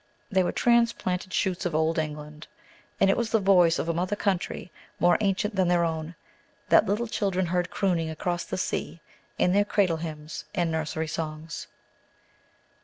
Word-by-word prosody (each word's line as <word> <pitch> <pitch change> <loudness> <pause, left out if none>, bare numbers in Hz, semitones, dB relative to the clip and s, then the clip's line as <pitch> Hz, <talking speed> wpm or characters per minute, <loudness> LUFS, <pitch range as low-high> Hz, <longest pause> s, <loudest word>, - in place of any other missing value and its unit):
They 190 -1 +4
were 180 - 0
transplanted 235 -6 +1
shoots 185 0 0
of 175 -4 -2
Old 160 +1 +2
England. 150 0 -6 0.5
And 195 - +5
it - - +2
was 235 -2 -1
the 225 - +3
voice 180 -4 +5
of - - -2
a 170 - +1
mother 180 +4 -1
country 190 -3 -2 0.3
more 175 0 +5
ancient 200 +1 0
than 190 -2 +2
their 175 -1 +3
own, 160 +1 -4 0.5
that - - +6
little 210 +4 0
children 195 -4 0
heard 180 +1 0
crooning 175 -5 0
across 175 +2 -2
the - - -4
sea 175 - -3 0.4
in 180 - +3
their 205 +1 +4
cradle 195 -5 +1
hymns 155 -1 -6
and 175 -3 +1
nursery 160 0 -2
songs. 155 0 -5
175 Hz, 170 wpm, -27 LUFS, 160-195 Hz, 0.5 s, that